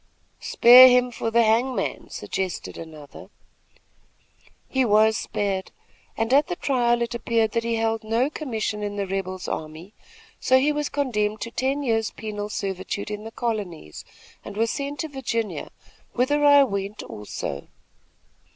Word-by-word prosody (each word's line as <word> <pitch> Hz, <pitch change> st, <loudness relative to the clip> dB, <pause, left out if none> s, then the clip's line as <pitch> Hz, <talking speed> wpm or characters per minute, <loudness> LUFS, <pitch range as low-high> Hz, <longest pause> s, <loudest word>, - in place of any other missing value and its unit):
"'Spare 250 Hz, +2 st, +8 dB
him 250 Hz, 0 st, +3 dB
for 230 Hz, -, -3 dB
the 235 Hz, +1 st, +4 dB
hangman,' 235 Hz, +4 st, 0 dB
suggested 190 Hz, -2 st, -4 dB
another. 155 Hz, -3 st, -11 dB, 1.4 s
"He 265 Hz, -1 st, +1 dB
was 220 Hz, -1 st, +4 dB
spared, 195 Hz, -3 st, -3 dB, 0.5 s
and 225 Hz, +2 st, 0 dB
at 285 Hz, +2 st, +5 dB
the 355 Hz, -, -3 dB
trial 240 Hz, -6 st, +1 dB
it 235 Hz, +1 st, -4 dB
appeared 230 Hz, -2 st, 0 dB
that 230 Hz, +1 st, -1 dB
he 230 Hz, 0 st, -1 dB
held 225 Hz, 0 st, -1 dB
no 225 Hz, +4 st, +1 dB
commission 220 Hz, -8 st, -3 dB
in 205 Hz, 0 st, -4 dB
the 200 Hz, -1 st, -2 dB
rebel's 185 Hz, -1 st, -4 dB
army, 160 Hz, +6 st, -6 dB, 0.5 s
so 260 Hz, -, +4 dB
he 280 Hz, +3 st, +2 dB
was 295 Hz, 0 st, -2 dB
condemned 215 Hz, -7 st, -1 dB
to 230 Hz, -, -5 dB
ten 270 Hz, +3 st, -1 dB
years' 225 Hz, -4 st, 0 dB
penal 210 Hz, -1 st, -6 dB
servitude 195 Hz, 0 st, -4 dB
in 210 Hz, +1 st, -6 dB
the 225 Hz, -, -7 dB
colonies, 205 Hz, -, -4 dB, 0.4 s
and 205 Hz, -, -9 dB
was 225 Hz, +1 st, +1 dB
sent 285 Hz, 0 st, -4 dB
to 320 Hz, -, -3 dB
Virginia, 245 Hz, -6 st, -3 dB, 0.4 s
whither 290 Hz, +4 st, +1 dB
I 285 Hz, -1 st, +7 dB
went, 200 Hz, -3 st, -4 dB
also. 85 Hz, -8 st, -6 dB
225 Hz, 150 wpm, -24 LUFS, 205-255 Hz, 1.4 s, Spare